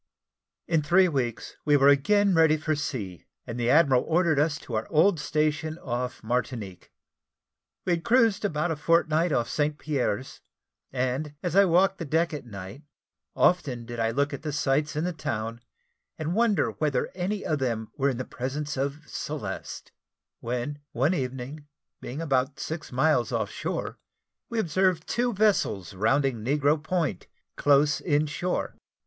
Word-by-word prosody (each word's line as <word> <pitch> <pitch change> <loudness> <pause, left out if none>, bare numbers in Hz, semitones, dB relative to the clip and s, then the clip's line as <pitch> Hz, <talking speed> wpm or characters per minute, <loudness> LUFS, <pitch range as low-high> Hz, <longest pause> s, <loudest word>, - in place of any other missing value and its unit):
In 165 -2 +2
three 180 +5 +4
weeks 120 -8 -3
we 145 -1 +4
were 140 0 +5
again 200 +8 +4
ready 160 -2 +5
for 155 +1 -1
sea, 130 - -4 0.2
and 120 +1 -6
the 120 0 +1
admiral 140 -4 +5
ordered 165 -3 +2
us 155 +1 +2
to 120 - -9
our 110 0 -1
old 165 +2 +4
station 155 +1 -1
off 125 -5 -4
Martinique. 110 -5 -3 0.9
We 180 - +1
had 170 -1 0
cruised 230 -4 +3
about 165 -4 0
a - - 0
fortnight 165 +2 +2
off 120 -4 +1
St. 150 0 -1
Pierre's, 130 -5 -2 0.5
and, 130 +4 -2
as 175 -1 -2
I 200 0 +7
walked 190 +2 +3
the 165 - -4
deck 160 +3 +1
at 145 -4 -6
night, 100 +4 -8 0.5
often 135 -10 +2
did 120 0 -7
I 115 0 +2
look 140 +5 0
at 140 - -5
the 155 - -3
sights 145 +1 0
in 155 - -1
the 180 0 -1
town, 115 -7 -4 0.6
and 160 +2 -2
wonder 225 0 +2
whether 145 -5 -1
any 190 +3 -3
of 155 -2 0
them 115 -4 -2
were 140 -1 +1
in 130 - -2
the 130 - -4
presence 145 +3 -4
of 140 +3 -2
Celeste, - - -6 0.5
when, 125 +5 -3
one 135 +9 +2
evening, 135 +1 -4 0.3
being 140 +6 -5
about 135 -1 0
six 160 -2 -5
miles 130 -2 +2
off - - -1
shore, - - -4 0.5
we 235 - -4
observed 185 -3 +1
two 245 +1 0
vessels 195 - +1
rounding 115 +4 +1
Negro 145 +4 +2
Point, 155 - -2 0.3
close 145 +1 +3
in 150 -2 +2
shore. 165 +5 -2
145 Hz, 160 wpm, -27 LUFS, 125-165 Hz, 0.9 s, I